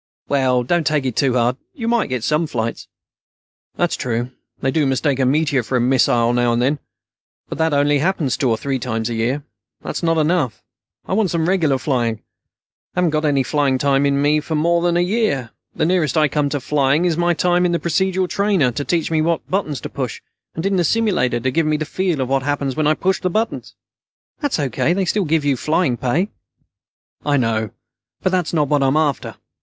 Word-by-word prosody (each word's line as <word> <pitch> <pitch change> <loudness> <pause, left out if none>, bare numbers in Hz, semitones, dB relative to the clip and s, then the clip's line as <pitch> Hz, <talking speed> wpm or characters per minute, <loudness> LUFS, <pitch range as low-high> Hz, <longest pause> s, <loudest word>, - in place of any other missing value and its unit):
"Well, 130 -3 +2
don't 165 +3 0
take 150 -2 +1
it 125 -4 -2
too 135 -3 +2
hard. 120 +1 +1 0.2
You 230 -4 -4
might 235 -6 +1
get 125 -3 -2
some 155 +4 +1
flights." 115 -4 -4 0.9
"That's - - 0
true. 120 +1 -3 0.3
They 135 - 0
do 150 0 +1
mistake 135 +1 0
a 130 - +2
meteor 140 -1 +2
for 120 +3 -4
a - - +1
missile 120 -1 +3
now 120 -1 +2
and 120 - +1
then. 140 +4 +1 0.7
But - - -6
that 160 0 +2
happens 145 +1 +1
only - - -1
two 130 - +2
or 115 - +1
three 135 +3 -2
times 110 0 -3
a - - -1
year. 120 +6 -1 0.4
That's - - -4
not 165 -1 +1
enough. 155 -8 0 0.4
I - - -3
want 205 -1 +2
some 165 -1 0
regular 165 -7 +2
flying. 125 -4 0 0.8
I 180 - +1
haven't 175 -3 +2
got 155 0 0
any 140 -3 +2
flying 140 0 +1
time 140 +1 +2
in 145 +2 +2
for 160 +1 -3
more 170 +3 +2
than 175 0 +1
a - - +3
year. 175 - 0 0.2
The - - +1
nearest 160 -6 +1
I 155 -1 +4
come 145 0 0
to 145 - -2
flying 140 +4 +1
is 170 -3 +1
my 175 +1 +1
time 175 +1 +2
in 180 - +2
the 170 - +1
procedural 185 +3 0
trainer, 195 -10 +1
to 130 +5 -3
teach 165 +1 -1
me 160 -1 +2
what 165 0 -1
buttons 155 -8 -1
to - - -5
push, - - -4 0.4
and 160 - -4
in 195 -1 +1
the 175 - +2
simulator, 170 - +1
to 130 +2 -1
give 160 +2 +1
me 155 0 +1
the 155 - -3
feel 180 -4 -1
of 130 - -1
what 135 +1 +1
happens 140 -1 -2
when 155 -1 +1
I 155 - +3
push 190 +4 0
the 185 - 0
buttons." 220 +5 -2 0.6
"That's 290 -3 -1
O.K. 140 +1 0
They 190 +1 0
still 200 +2 0
give 155 -1 +1
you - - +2
your 135 - +1
flying 155 -1 +1
pay." 145 - 0 0.9
"I 145 -1 +2
know, 110 -3 0 0.5
but 185 - +1
that's 180 -3 0
not 150 -3 +1
what 145 0 +2
I'm 135 +2 +2
after. 150 -4 -1
150 Hz, 220 wpm, -19 LUFS, 130-170 Hz, 0.9 s, I